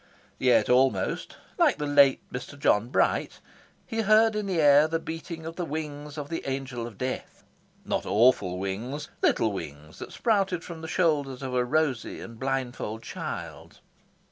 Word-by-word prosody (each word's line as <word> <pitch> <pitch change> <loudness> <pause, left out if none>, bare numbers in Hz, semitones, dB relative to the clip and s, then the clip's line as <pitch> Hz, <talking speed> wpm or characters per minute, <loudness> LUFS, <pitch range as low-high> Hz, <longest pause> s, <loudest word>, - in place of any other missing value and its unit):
Yet 125 -2 +4
almost, 130 +1 +1 0.2
like 320 -6 +4
the 150 - -3
late 140 -2 +5
Mr. 125 +3 -6
John 115 -5 +2
Bright, - - +1 0.5
he 225 -2 -2
heard 220 +1 +4
in 210 -1 -2
the 185 -4 0
air 145 0 +6
the 165 +1 0
beating 165 0 -7
of 165 +1 -7
the 180 - -2
wings 150 -1 -5
of 145 -1 -4
the 165 - -3
Angel 130 -3 -4
of 110 -4 -12
Death. 130 0 -5 0.4
Not - - -2
awful 105 -5 +3
wings; 110 +10 -4
little 110 - +2
wings 75 -4 -8
that - - -8
sprouted 195 -6 +1
from 165 -2 -8
the 160 - -6
shoulders 145 -7 0
of 130 -1 -4
a 125 -1 +2
rosy 130 -2 0
and 115 -1 -10
blindfold 130 -4 -3
child. - - -7
140 Hz, 165 wpm, -27 LUFS, 125-165 Hz, 0.5 s, air